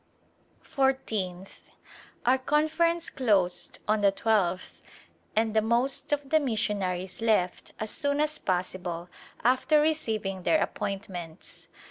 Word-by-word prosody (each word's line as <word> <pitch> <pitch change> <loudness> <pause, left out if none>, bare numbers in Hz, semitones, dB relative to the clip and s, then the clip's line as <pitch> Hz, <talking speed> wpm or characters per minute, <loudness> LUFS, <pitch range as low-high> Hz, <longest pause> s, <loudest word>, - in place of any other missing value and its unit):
Fourteenth. 215 - -2 0.6
Our 255 +2 +4
Conference 315 +4 +1
closed 200 -8 +1
on 215 0 +2
the 200 -1 +5
twelfth 195 -4 0 0.5
and 220 0 +2
the 220 - +5
most 235 +7 0
of 290 -2 -1
the 315 - +6
missionaries 200 -7 -1
left 210 -6 +1
as 215 0 -3
soon 285 -2 -1
as 305 0 0
possible 180 -2 -2 0.3
after 260 +5 +4
receiving 220 -11 0
their 315 - +3
appointments. 180 -5 -5
220 Hz, 110 wpm, -28 LUFS, 185-275 Hz, 0.6 s, the